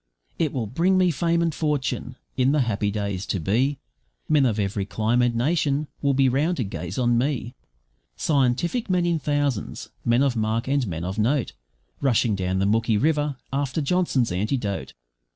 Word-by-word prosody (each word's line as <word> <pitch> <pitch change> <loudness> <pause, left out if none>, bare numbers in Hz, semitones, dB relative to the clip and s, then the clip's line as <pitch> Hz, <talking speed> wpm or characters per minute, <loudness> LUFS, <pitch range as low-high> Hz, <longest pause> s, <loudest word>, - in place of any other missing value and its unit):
It 155 -4 +1
will 125 -4 -2
bring 175 - +2
me 180 -1 +4
fame 170 +3 +1
and 165 -2 0
fortune! 140 -4 -2 0.2
In 130 +2 +2
the 150 - +3
happy 105 -4 0
days 100 -2 -3
to 100 - -1
be, 125 - +1 0.5
Men 145 -4 +4
of 110 -2 -1
every 100 0 -1
clime 110 +4 0
and 120 -1 +2
nation 145 +2 +1
will 140 -1 +2
be 135 0 +4
round 150 +8 +1
to 125 - 0
gaze 90 -2 -5
on 120 -2 +2
me 125 -2 -2 0.6
Scientific 150 - +1
men 180 -1 +2
in 170 -2 +1
thousands, 145 -5 -2
men 120 +3 +3
of 135 -3 +1
mark 110 +2 -1
and 135 -3 +1
men 85 -2 -4
of 95 +4 -3
note, 125 +4 +1 0.5
Rushing 120 -4 +2
down 95 0 -1
the 95 - +1
Mooki 110 +1 +2
River, 150 -1 +1 0.2
after 140 +1 -1
Johnson's 145 - +1
antidote. 100 +2 -2
130 Hz, 175 wpm, -24 LUFS, 110-145 Hz, 0.6 s, me